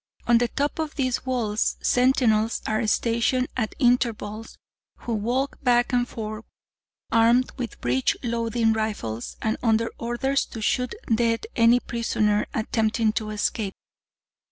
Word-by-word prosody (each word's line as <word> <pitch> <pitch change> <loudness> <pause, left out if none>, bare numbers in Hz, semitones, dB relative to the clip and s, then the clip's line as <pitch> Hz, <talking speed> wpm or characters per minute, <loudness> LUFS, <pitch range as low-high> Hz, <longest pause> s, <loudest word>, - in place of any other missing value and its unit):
"On 235 -1 +5
the 240 - +2
top 285 +6 -2
of 315 -1 -3
these 260 -2 -1
walls, 225 -4 0
sentinels 240 -3 +2
are 215 0 0
stationed 235 +4 +1
at 220 -4 -2
intervals, 230 -4 0 0.4
who 235 - -3
walk 245 +6 -1
back 245 -2 +2
and 245 0 +2
forth, 215 0 -6 0.7
armed 235 +3 +4
with 245 -5 -6
breech 125 +2 +1
loading 230 -1 +1
rifles, 210 - -3
and 220 0 0
under 230 -1 +2
orders 240 +4 0
to 225 - -8
shoot 250 +3 0 0.2
dead 230 - +1
any 235 +1 +5
prisoner 215 -3 0
attempting 220 0 0
to 215 -1 -3
escape. 210 -1 -2
230 Hz, 130 wpm, -24 LUFS, 220-245 Hz, 0.7 s, On